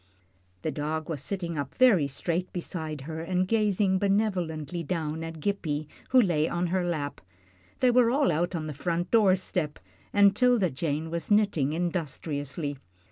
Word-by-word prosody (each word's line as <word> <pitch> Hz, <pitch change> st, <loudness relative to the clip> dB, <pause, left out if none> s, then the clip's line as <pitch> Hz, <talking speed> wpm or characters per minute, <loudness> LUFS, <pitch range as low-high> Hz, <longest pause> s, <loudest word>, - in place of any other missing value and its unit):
The -, -, -1 dB
dog 155 Hz, +2 st, -3 dB
was 150 Hz, -5 st, -3 dB
sitting 170 Hz, -2 st, -3 dB
up 140 Hz, -2 st, -5 dB
very 215 Hz, -, +5 dB
straight 170 Hz, +6 st, -2 dB
beside 160 Hz, -4 st, -4 dB
her, 160 Hz, +3 st, -6 dB
and 180 Hz, +2 st, 0 dB
gazing 205 Hz, -3 st, +2 dB
benevolently 180 Hz, -6 st, 0 dB
down 160 Hz, -1 st, -3 dB
at 165 Hz, -1 st, -6 dB
Gippie, 155 Hz, -5 st, -2 dB, 0.2 s
who 260 Hz, -, +6 dB
lay 165 Hz, -8 st, +2 dB
on 175 Hz, +1 st, -1 dB
her 185 Hz, -1 st, +2 dB
lap. 155 Hz, -5 st, -3 dB, 0.6 s
They 255 Hz, -, +5 dB
were 245 Hz, -1 st, +5 dB
all 275 Hz, +3 st, +3 dB
out 175 Hz, +4 st, 0 dB
on 160 Hz, -2 st, -3 dB
the 155 Hz, -, -4 dB
front 170 Hz, +4 st, -2 dB
door 210 Hz, -5 st, +5 dB
step, 180 Hz, -5 st, -3 dB, 0.3 s
and 200 Hz, -1 st, +5 dB
'Tilda 240 Hz, -7 st, +3 dB
Jane 155 Hz, +3 st, -2 dB
was 170 Hz, 0 st, -3 dB
knitting 200 Hz, -9 st, +2 dB
industriously. 150 Hz, -4 st, -3 dB
170 Hz, 160 wpm, -28 LUFS, 155-195 Hz, 0.6 s, who